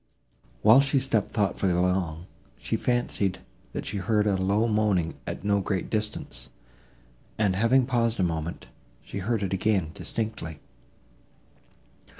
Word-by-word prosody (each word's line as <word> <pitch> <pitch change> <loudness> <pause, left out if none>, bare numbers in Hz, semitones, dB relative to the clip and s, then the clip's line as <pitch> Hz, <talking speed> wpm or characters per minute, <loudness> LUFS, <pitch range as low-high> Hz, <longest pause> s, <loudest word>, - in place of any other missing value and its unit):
While 115 +5 +8
she 140 0 +1
stepped 125 -6 +1
thoughtfully 100 -3 0
along, 90 -2 0 0.3
she - - -2
fancied, 120 -6 0 0.4
that - - -4
she 100 - -3
heard 105 +2 +1
a 100 -2 +2
low 100 +4 +2
moaning 105 -6 +1
at - - -5
no 100 -1 +2
great 95 -2 -2
distance, 105 - -3 0.9
and, 100 -4 +2
having 120 +5 +4
paused 115 -3 0
a - - +3
moment, 80 -1 -3 0.4
she - - -6
heard 105 +2 -1
it 95 - -2
again 95 0 +2
and 80 0 -10
distinctly. 105 -10 -4
100 Hz, 140 wpm, -27 LUFS, 90-110 Hz, 0.9 s, While